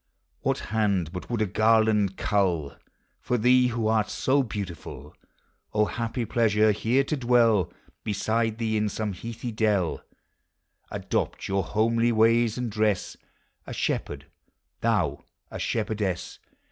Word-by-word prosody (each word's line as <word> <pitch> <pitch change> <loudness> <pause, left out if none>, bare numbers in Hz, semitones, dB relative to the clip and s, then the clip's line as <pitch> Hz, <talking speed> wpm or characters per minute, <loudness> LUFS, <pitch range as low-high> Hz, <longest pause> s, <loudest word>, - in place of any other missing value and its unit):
What - - 0
baud 100 -7 +1
but 90 - -7
would 115 -3 0
a - - +1
garland 110 -1 +3
cull 90 -8 0 0.5
Tor 125 - 0
thee 125 +2 +4
who 115 -2 -1
art 110 -1 +2
so 140 +2 +2
beautiful? 90 - -7 0.6
O 105 0 +4
happy 115 +2 -3
pleasure! 110 -1 +3
here 115 +6 +1
to 150 - -2
dwell 120 - +3 0.3
tteside 110 +2 0
thee 110 -2 0
in 105 0 +1
some 105 -1 -3
heathy 115 +5 -6
dell; 105 -6 +1 0.9
Adopt - - -2
your 95 0 +1
homely 115 +5 +1
ways 115 +1 +3
and 125 -2 -3
dress, 105 -2 0 0.5
A - - -6
shepherd, - - -2 0.5
thou - - 0 0.3
a - - -6
shepherdess! 105 -5 -2
110 Hz, 130 wpm, -26 LUFS, 100-115 Hz, 0.9 s, thee